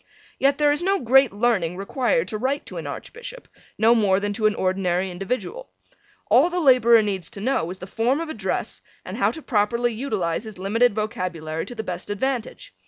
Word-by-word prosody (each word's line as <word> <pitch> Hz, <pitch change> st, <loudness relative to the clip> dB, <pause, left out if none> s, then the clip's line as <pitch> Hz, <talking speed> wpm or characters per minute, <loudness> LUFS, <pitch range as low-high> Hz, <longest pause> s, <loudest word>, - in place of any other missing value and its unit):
Yet 275 Hz, +1 st, +3 dB
there 295 Hz, -1 st, +4 dB
is 295 Hz, +2 st, 0 dB
no 390 Hz, +2 st, +1 dB
great 265 Hz, 0 st, +4 dB
learning 200 Hz, -5 st, 0 dB
required 260 Hz, -, 0 dB
to 215 Hz, -, -4 dB
write 270 Hz, +4 st, -1 dB
to -, -, -9 dB
an -, -, -5 dB
Archbishop, -, -, -8 dB, 0.3 s
no 225 Hz, +2 st, +5 dB
more 200 Hz, -4 st, +3 dB
than 205 Hz, 0 st, -2 dB
to 215 Hz, +1 st, +2 dB
an 210 Hz, -, 0 dB
ordinary 185 Hz, 0 st, 0 dB
individual. 250 Hz, -, -4 dB, 0.6 s
All -, -, +6 dB
the 360 Hz, 0 st, -2 dB
laborer 240 Hz, -6 st, +5 dB
needs 190 Hz, -5 st, -3 dB
to 230 Hz, -, -10 dB
know 215 Hz, -6 st, 0 dB
is 185 Hz, -, -6 dB
the 185 Hz, -, -8 dB
form 235 Hz, +8 st, 0 dB
of 330 Hz, -, -4 dB
address 215 Hz, -11 st, -3 dB, 0.2 s
and -, -, -6 dB
how -, -, +2 dB
to 320 Hz, -, -7 dB
properly 235 Hz, +1 st, +1 dB
utilize 215 Hz, -7 st, -2 dB
his 215 Hz, -3 st, -9 dB
limited 210 Hz, +4 st, +2 dB
vocabulary 175 Hz, -7 st, -3 dB
to 245 Hz, -, -7 dB
the 220 Hz, -, -4 dB
best 180 Hz, -2 st, -6 dB
advantage. 245 Hz, +3 st, -3 dB
220 Hz, 195 wpm, -23 LUFS, 190-265 Hz, 0.6 s, All